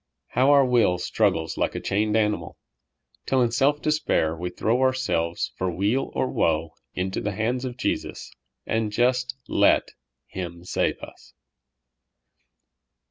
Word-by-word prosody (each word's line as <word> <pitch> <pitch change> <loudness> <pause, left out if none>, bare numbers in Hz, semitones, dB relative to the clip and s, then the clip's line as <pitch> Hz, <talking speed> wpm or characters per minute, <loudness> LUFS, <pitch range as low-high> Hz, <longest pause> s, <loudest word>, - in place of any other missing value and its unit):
how 130 +2 +3
our 140 -1 +6
will 120 -8 +3
struggles 90 -4 0
like - - 0
a - - -2
chained 105 +2 0
animal, 105 -1 -1 0.7
till 135 - +2
in 120 -2 +2
self 140 +5 +2
despair 150 - +1
we 90 +2 -4
throw 110 +7 0
ourselves 130 -11 0
for 95 - -1
weal 100 +9 0
or - - +1
woe 80 -5 0 0.2
into 95 +1 -2
the 105 - -2
hands 120 +5 -1
of 125 -1 -5
Jesus, - - -3 0.3
and 110 -1 -1
just 125 +3 +1
let - - +3 0.3
Him 85 -2 -7
save 90 - -1
us - - -13
110 Hz, 135 wpm, -25 LUFS, 90-130 Hz, 0.7 s, our